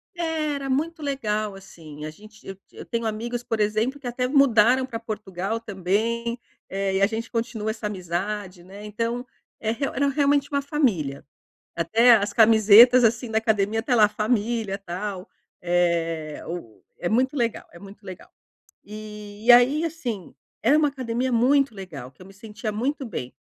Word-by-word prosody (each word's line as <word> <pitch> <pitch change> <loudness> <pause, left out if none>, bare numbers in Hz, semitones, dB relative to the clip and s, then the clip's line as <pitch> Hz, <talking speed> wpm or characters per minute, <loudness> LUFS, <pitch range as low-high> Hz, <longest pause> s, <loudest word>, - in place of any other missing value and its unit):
é, 320 -3 -1
era 275 -1 -5
muito 315 +5 -1
legal, 215 -8 -2
assim. 155 -5 -11
A - - -4
gente 215 +6 -16
eu 195 - -8
eu - - -11
tenho 230 -1 -3
amigos, 235 +3 -3
por 225 -2 -3
exemplo, 215 +7 0
que 260 - -7
até 250 +1 -1
mudaram 255 -2 +4
pra 230 -3 -6
Portugal 210 -1 -4
também, 230 +4 -2 0.3
eh, 195 0 -2
e 190 - +1
a 200 - +5
gente 225 +1 -5
continua 230 -2 -3
essa 215 -1 -5
amizade, 185 0 -4
né. 195 +3 -12
Então, 230 +4 -3 0.3
é 220 0 -1
real 275 +4 -3
era 280 +1 +2
realmente 285 0 +2
uma 280 -1 0
família. 215 - -1 0.5
Até 225 +9 +4
as 205 -2 +1
camisetas, 225 +2 +7
assim, 235 +2 +1
na 220 0 +1
academia, 220 0 0
tá 250 +1 0
lá: 215 -3 +6
"Família", 215 -1 -1
tal. 190 0 -6 0.3
Eh, 170 -3 -1
o 165 -11 -8 0.2
é 175 - -2
muito 260 +6 +1
legal, 235 -3 -1
é 170 - -13
muito 200 +2 -14
legal. 185 -2 -10 0.5
E 210 0 -10
e 245 - +8
aí, 260 +7 +5
assim, 245 - -5 0.3
era 280 +7 +4
uma 305 -1 +3
academia 255 -1 -3
muito 265 +2 +3
legal, 160 -10 -9
que 135 - -22
eu - - -12
me 195 - -14
sentia 215 +1 -6
muito 265 +6 -2
bem. 145 - -6
220 Hz, 170 wpm, -24 LUFS, 195-245 Hz, 0.5 s, e